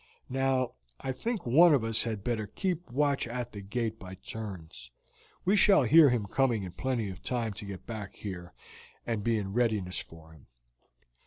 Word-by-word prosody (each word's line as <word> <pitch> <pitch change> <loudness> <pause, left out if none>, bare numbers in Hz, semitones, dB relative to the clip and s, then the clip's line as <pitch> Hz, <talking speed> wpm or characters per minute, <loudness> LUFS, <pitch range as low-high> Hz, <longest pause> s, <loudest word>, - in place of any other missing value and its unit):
Now, 130 -1 +1 0.3
I 135 - -3
think 220 - -3
one 155 +6 +7
of 125 - 0
us 115 0 0
had 110 -4 -3
better 110 -3 -1
keep 175 - -3
watch 140 +1 +1
at 120 0 -4
the 100 - -7
gate 110 +2 -3
by 95 -1 -9
turns. 95 - -8 0.6
We 195 +3 +4
shall 200 -6 +6
hear 150 +4 +7
him 120 -4 0
coming 120 0 +1
in 90 - -6
plenty 120 -2 -2
of 90 - -10
time 115 -4 -2
to 100 - -8
get 100 -2 -8
back 110 -5 -6
here 90 -3 -7 0.5
and 115 -3 -2
be 115 0 +2
in 100 -2 -3
readiness 110 -6 +1
for 80 0 -12
him. 80 -4 -18
115 Hz, 180 wpm, -30 LUFS, 100-130 Hz, 0.6 s, one